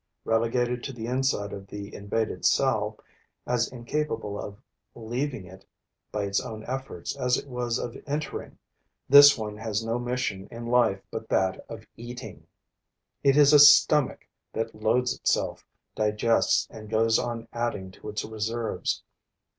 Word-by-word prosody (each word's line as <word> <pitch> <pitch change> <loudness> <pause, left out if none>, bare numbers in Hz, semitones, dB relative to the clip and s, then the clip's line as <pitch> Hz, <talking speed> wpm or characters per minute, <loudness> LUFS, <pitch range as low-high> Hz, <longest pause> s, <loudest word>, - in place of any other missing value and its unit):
Relegated 120 +2 0
to 135 - -4
the 115 -2 -6
inside 125 -4 -1
of 100 -1 -8
the 100 +1 -8
invaded 105 +2 -3
cell, - - +2 0.5
as 120 -1 0
incapable 120 -4 -3
of 100 0 -8 0.4
leaving 120 -1 -4
it 95 +1 -14 0.5
by 105 - -2
its 100 0 0
own 110 -3 -7
efforts 130 -9 -5
as 125 -2 +2
it - - -7
was 125 -3 -2
of 120 - -5
entering, 150 +2 -4 0.5
this 145 +1 +9
one 105 -2 -5
has 110 0 -3
no 115 +2 -1
mission 120 -5 -3
in 115 0 -8
life 115 -5 +2
but 110 0 -6
that 95 -1 +1
of - - -9
eating. 120 +1 -9 0.7
It 140 0 +4
is 145 0 +7
a 150 - +9
stomach 145 -1 +6 0.3
that 115 0 -3
loads 115 +4 +1
itself, - - -1 0.3
digests 110 +2 +2
and 110 -2 -10
goes 115 +1 +3
on 115 -1 -4
adding 115 -6 -3
to 105 - -10
its 105 0 -3
reserves. 110 +1 -3
115 Hz, 145 wpm, -27 LUFS, 105-125 Hz, 0.7 s, this